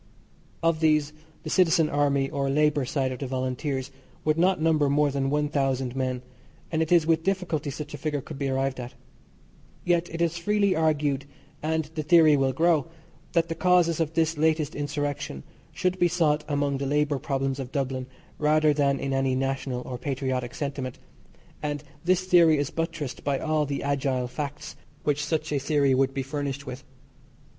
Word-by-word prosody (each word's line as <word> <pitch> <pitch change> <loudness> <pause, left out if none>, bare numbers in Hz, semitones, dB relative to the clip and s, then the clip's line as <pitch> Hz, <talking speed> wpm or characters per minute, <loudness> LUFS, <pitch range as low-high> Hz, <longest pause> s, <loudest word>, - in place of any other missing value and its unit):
Of 165 -1 +2
these, 155 -2 +2 0.3
the - - -5
Citizen 170 -3 +4
Army 140 -2 +1
or 140 -1 -1
Labour 150 0 +2
side 130 0 -1
of 130 - -6
the 135 - -3
Volunteers, 130 +1 -2 0.3
would 155 0 +3
not 185 +2 +3
number 155 -3 +3
more 145 0 +3
than 135 0 -1
one 150 +1 +1
thousand 135 -3 -1
men, 130 -1 -2 0.5
and 160 -1 +1
it 160 - -1
is 170 -3 +5
with 165 0 +2
difficulty 175 -5 -1
such 150 +2 -6
a 145 - -6
figure 150 0 -1
could 145 +1 -9
be 140 -1 -1
arrived 135 0 -1
at. 125 0 -7 0.9
Yet 175 0 +2
it 165 - -5
is 170 0 0
freely 200 +1 +2
argued, 150 -3 +1 0.4
and 160 0 0
the 160 - -2
theory 155 -1 +6
will 135 -1 +2
grow, 160 +1 +2 0.5
that 170 -1 +2
the 165 - -2
causes 175 -1 +3
of 160 -1 -1
this 165 -2 +1
latest 155 -1 +2
insurrection 145 - -3 0.3
should 185 0 -1
be 175 - +5
sought 160 -3 +1
among 145 -2 0
the 140 - -2
labour 145 0 +1
problems 135 -1 -2
of 130 -1 -5
Dublin 130 -2 -2 0.3
rather 155 0 +4
than 140 -2 +1
in 135 - -2
any 135 -1 +1
national 135 -1 -2
or 125 0 -6
patriotic 130 -2 -2
sentiment, 140 -3 -4 0.6
and 145 -1 -3 0.2
this 185 +1 +2
theory 170 -4 +5
is 145 +1 -1
buttressed 165 -5 -4
by 140 -1 +1
all 155 0 0
the 140 0 -3
agile 135 -3 0
facts 145 +3 -6 0.3
which 145 0 0
such 155 +1 -2
a 145 - +1
theory 140 -1 +2
would 135 +1 +2
be 135 -1 -3
furnished 140 0 -4
with. 125 0 -7
145 Hz, 180 wpm, -26 LUFS, 135-160 Hz, 0.9 s, theory